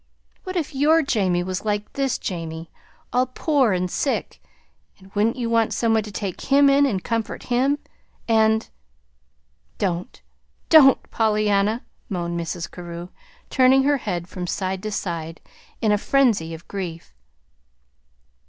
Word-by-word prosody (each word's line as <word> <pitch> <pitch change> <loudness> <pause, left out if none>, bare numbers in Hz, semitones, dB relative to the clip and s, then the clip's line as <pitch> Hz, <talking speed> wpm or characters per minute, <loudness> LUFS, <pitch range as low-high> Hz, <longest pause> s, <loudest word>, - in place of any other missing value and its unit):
"What 370 0 -5
if 320 -5 -2
your 310 +4 +4
Jamie 190 -9 +1
was 185 +1 -4
like 210 -1 -2
this 275 -2 0
Jamie, 165 -3 -5 0.4
all 250 +1 +2
poor 265 -2 +1
and 180 -1 0
sick, 65 - -2 0.7
wouldn't 215 +4 +1
you 245 -3 -2
want 230 -1 +1
some 230 -1 +2
one 220 - +3
to 210 0 -8
take 200 -3 -5
him 280 0 +4
in 280 +1 +4
and 190 -8 -2
comfort 230 -1 -3
him, 270 +4 +2 0.5
and 220 -1 +3 0.5
" - - -43
"Don't 180 +7 -5 0.5
don't, 285 -5 +8
Pollyanna," 215 0 +1 0.3
moaned 170 -3 -2
Mrs. 170 +1 -4
Carew, 175 0 -8 0.4
turning 265 0 +5
her 285 +1 +3
head 180 -8 -4
from 180 -2 -6
side 190 +1 -2
to 215 - -4
side, 165 -5 -4 0.4
in 220 - +2
a 210 - +2
frenzy 225 -11 +2
of 160 - -14
grief. 175 -4 -6
210 Hz, 145 wpm, -23 LUFS, 175-255 Hz, 0.7 s, don't